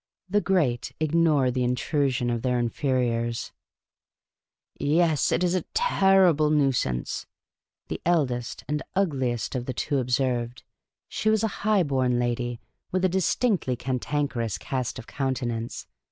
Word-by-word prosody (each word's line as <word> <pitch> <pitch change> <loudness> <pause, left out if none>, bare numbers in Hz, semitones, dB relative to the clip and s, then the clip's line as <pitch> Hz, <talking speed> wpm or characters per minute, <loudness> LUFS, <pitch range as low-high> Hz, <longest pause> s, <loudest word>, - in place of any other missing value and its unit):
The 205 +2 +2
great 145 -12 +1
ignore 155 -4 +3
the 125 0 -1
intrusion 125 0 0
of 120 -1 -1
their 125 0 +1
inferiors. 120 -1 -1 0.6
" - - -67
Yes, 160 0 +2
it - - +1
's 180 -1 +2
a 185 - +1
terrible 190 - +4
nuisance," 135 - 0 0.6
the - - -5
eldest 130 -8 0
and 150 0 -1
ugliest 130 - 0
of 125 -2 -3
the 130 - -2
two 140 - 0
observed 125 -1 -1 0.2
— - - -66
she 215 - -1
was 220 0 +2
a - - +3
high 210 -2 +3
born 130 -4 +1
lady, 120 0 -1 0.3
with 185 0 +1
a - - +3
dis 190 0 +1
tinctly 190 - 0
cantankerous 125 -4 -2
cast 130 +6 -3
of 120 - -8
countenance. 125 -4 -3
135 Hz, 140 wpm, -26 LUFS, 120-165 Hz, 0.6 s, terrible